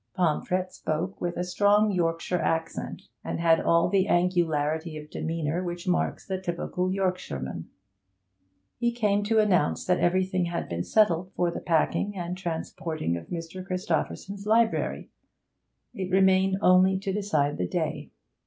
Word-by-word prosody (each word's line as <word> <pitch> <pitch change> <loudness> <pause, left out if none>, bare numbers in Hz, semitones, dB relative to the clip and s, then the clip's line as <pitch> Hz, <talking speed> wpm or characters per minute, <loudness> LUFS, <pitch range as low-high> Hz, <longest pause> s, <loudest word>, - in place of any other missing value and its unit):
Pomfret 180 +1 0
spoke 170 +5 -3
with 175 -1 -2
a 175 - 0
strong 205 +3 +3
Yorkshire 170 0 0
accent, 165 0 -2 0.2
and - - -3
had 165 -1 +4
all 170 0 +3
the 195 -1 +2
angularity 160 -3 +1
of 150 0 -10
demeanour 165 +1 -2
which 175 0 -5
marks 180 - 0
the 190 -1 -3
typical 180 +1 -2
Yorkshireman. 180 - -3 1.1
He 235 0 +2
came 210 -4 +1
to 220 +1 +1
announce 205 -4 +2
that 180 0 +2
everything 185 0 +1
had 170 0 -3
been 85 0 -3
settled 185 - +2
for 175 -1 +1
the - - -5
packing 180 +4 0
and 175 0 -3
transporting 165 - -3
of 85 - -7
Mr. 170 +2 -6
Christopherson's 195 +2 -3
library; 225 +1 +1 0.8
it 185 -1 -4
remained 190 0 +4
only 185 +1 +5
to 195 0 -3
decide 155 -8 0
the 90 - 0
day. - - -3
180 Hz, 145 wpm, -27 LUFS, 165-190 Hz, 1.1 s, only